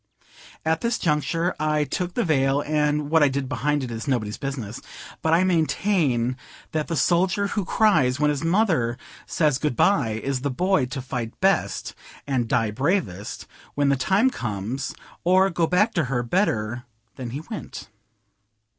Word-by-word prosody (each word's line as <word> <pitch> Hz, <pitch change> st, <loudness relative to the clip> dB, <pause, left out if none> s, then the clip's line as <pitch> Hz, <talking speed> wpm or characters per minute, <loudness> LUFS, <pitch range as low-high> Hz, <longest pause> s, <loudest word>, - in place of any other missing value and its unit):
At 160 Hz, 0 st, +1 dB
this 235 Hz, -1 st, 0 dB
juncture 165 Hz, +3 st, 0 dB
I 155 Hz, 0 st, +1 dB
took 175 Hz, +5 st, -3 dB
the 240 Hz, -, +1 dB
veil, 140 Hz, -3 st, +2 dB
and 150 Hz, 0 st, 0 dB
what 160 Hz, -1 st, +5 dB
I 145 Hz, -, +6 dB
did 135 Hz, 0 st, -2 dB
behind 145 Hz, +2 st, 0 dB
it 125 Hz, -, -5 dB
is 115 Hz, +2 st, -5 dB
nobody's 110 Hz, -6 st, -1 dB
business; 130 Hz, -5 st, -5 dB, 0.4 s
but 160 Hz, -, +1 dB
I 170 Hz, +3 st, +4 dB
maintain 160 Hz, -, +1 dB, 0.3 s
that 155 Hz, -1 st, -1 dB
the 165 Hz, -, -2 dB
soldier 180 Hz, +6 st, +2 dB
who 205 Hz, -, -1 dB
cries 170 Hz, -, +3 dB
when 150 Hz, 0 st, +3 dB
his 145 Hz, +1 st, -3 dB
mother 165 Hz, -, +2 dB, 0.3 s
says 150 Hz, -5 st, +1 dB
"Good 150 Hz, -5 st, -1 dB
bye," 115 Hz, -, +2 dB
is 135 Hz, -2 st, -1 dB
the 140 Hz, -, -1 dB
boy 175 Hz, 0 st, +1 dB
to 130 Hz, +1 st, -5 dB
fight 120 Hz, -3 st, -5 dB
best, 195 Hz, +1 st, +1 dB, 0.3 s
and 130 Hz, -4 st, 0 dB
die 110 Hz, -1 st, +1 dB
bravest, 130 Hz, -, -2 dB, 0.3 s
when 145 Hz, -1 st, +2 dB
the 140 Hz, -, +4 dB
time 195 Hz, -, +2 dB
comes, 110 Hz, -, -4 dB, 0.3 s
or 185 Hz, +2 st, +4 dB
go 170 Hz, -1 st, +1 dB
back 210 Hz, +6 st, +2 dB
to 170 Hz, -, +1 dB
her 120 Hz, -1 st, -1 dB
better 120 Hz, -, 0 dB, 0.3 s
than 125 Hz, -2 st, -5 dB
he 135 Hz, +6 st, -5 dB
went. -, -, -7 dB
145 Hz, 165 wpm, -24 LUFS, 125-175 Hz, 0.4 s, I